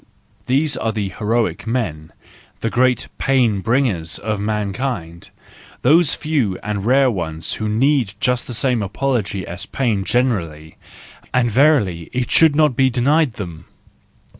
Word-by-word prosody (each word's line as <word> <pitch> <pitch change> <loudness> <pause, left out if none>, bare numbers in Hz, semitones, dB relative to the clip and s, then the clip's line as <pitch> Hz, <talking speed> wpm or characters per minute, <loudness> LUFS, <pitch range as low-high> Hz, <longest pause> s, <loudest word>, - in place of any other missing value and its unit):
These 145 +4 +2
are 115 - -1
the 105 -3 -3
heroic 105 -2 -1
men, 90 -11 -3 0.5
the 115 - -1
great 125 0 +2
pain 125 -7 +2
bringers 110 -9 0
of 105 -1 -3
mankind: 105 -4 -3 0.5
those 155 +4 +4
few 135 -12 -1
and 105 -2 -3
rare 130 +1 +4
ones 80 -5 -3
who 110 - -1
need 120 -2 +1
just 125 -1 0
the 120 - -5
same 120 0 0
apology 105 -2 -2
as 90 +4 -7
pain 115 -7 -1
generally,—and 105 +3 -3
verily, 105 - +2
it 125 -1 -2
should 160 -3 +5
not 150 -4 +3
be 130 +1 +3
denied 135 +3 +2
them! 85 -6 -8
115 Hz, 135 wpm, -19 LUFS, 95-130 Hz, 0.5 s, should